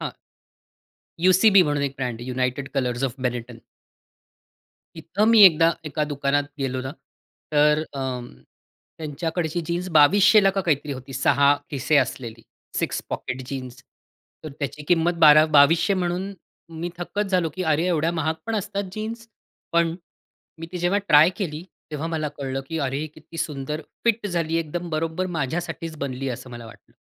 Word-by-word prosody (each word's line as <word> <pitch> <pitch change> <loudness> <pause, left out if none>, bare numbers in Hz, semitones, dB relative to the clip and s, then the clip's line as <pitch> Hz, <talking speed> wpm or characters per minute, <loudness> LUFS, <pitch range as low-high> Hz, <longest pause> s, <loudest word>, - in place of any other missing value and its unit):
हां. - - -4 1.1
UCB 185 +3 +6
म्हणून 145 -3 0
एक 140 -1 -2
ब्रँड 125 -3 -4
आहे, 125 +2 -6
United 130 +2 -2
Colors 125 -1 0
of 125 - -13
Benetton. 120 -1 -5 1.4
इथं 170 +6 -1
मी 225 -2 +7
एकदा, 165 -2 +5
एका 150 0 -2
दुकानात 140 0 +1
गेलो 130 -2 -2
ना, 130 - -5 0.6
तर 150 +1 +4
अ, 135 - -4 1.0
त्यांच्याकडची 160 +2 -3
जीन्स 175 +2 -2
2,200 185 +7 +6
ला 195 - +5
का 195 - +1
काहीतरी 150 -5 -1
होती, 130 0 -9
6 140 +2 +3 0.2
खिसे 145 +2 +1
असलेली, 115 -5 -1 0.4
6 - - -2
पॉकेट 130 +1 -4
जीन्स. 130 -1 -7 0.6
तर 155 - -7
त्याची 140 +1 -4
किंमत 175 0 +3
बारा 155 0 +8
2,200 165 +7 +5
म्हणून 185 +1 -2 0.5
मी 175 +1 -3
थक्कच 205 +4 -2
झालो, 180 -3 +2
की 185 - -3
"अरे, 160 0 +1
एवढ्या 165 -2 +1
महाग 160 -1 -1
पण 225 - -2
असतात 200 0 -3
जीन्स?" 225 +3 -6 0.5
पण 170 -1 +2 0.7
मी 165 - -5
ती 180 - -4
जेव्हा 175 +3 +1
ट्राय 155 +1 +7
केली, 160 -6 -4 0.3
तेव्हा 150 +1 -4
मला 160 -2 -2
कळलं, 135 -1 -3
की 165 - -3
"अरे, 135 -2 -1
ही 155 - -3
किती 160 +1 -14
सुंदर 150 0 -3 0.2
फिट 230 -2 +1
झाली 165 -4 -1
आहे, 165 - 0
एकदम 175 +3 -5
बरोबर 165 +3 -2
माझ्यासाठीच 160 +3 -4
बनली 135 -1 -3
आहे," 125 - -2
असं 125 - -11
मला 120 -1 -9
वाटलं. 110 - -17
155 Hz, 160 wpm, -23 LUFS, 140-175 Hz, 1.4 s, बारा